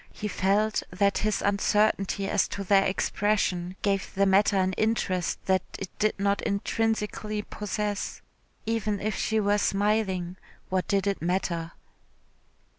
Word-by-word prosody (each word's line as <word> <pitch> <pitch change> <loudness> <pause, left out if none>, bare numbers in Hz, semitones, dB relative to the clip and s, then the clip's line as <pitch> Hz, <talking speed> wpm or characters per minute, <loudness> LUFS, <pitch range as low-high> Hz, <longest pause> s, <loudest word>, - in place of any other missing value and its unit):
He 210 - -5
felt 210 +2 +1
that 200 +2 +1
his 215 0 0
uncertainty 200 -1 +1
as - - +2
to 200 - -5
their 195 0 +4
expression 190 -2 0
gave 195 -1 0
the 200 +1 +3
matter 195 +1 +4
an 190 0 +1
interest 185 -4 0
that 190 -1 +3 0.2
it 195 - -6
did 215 -1 +1
not 200 0 +1
intrinsically 210 0 -1
possess. 210 0 -3 0.5
Even 215 -2 -1
if 215 0 -2
she 220 0 0
were 205 0 +2
smiling, 195 -3 0 0.3
what 185 -1 0
did 200 -1 +1
it 200 -1 -1
matter? 170 -1 -1
200 Hz, 135 wpm, -27 LUFS, 190-210 Hz, 0.5 s, their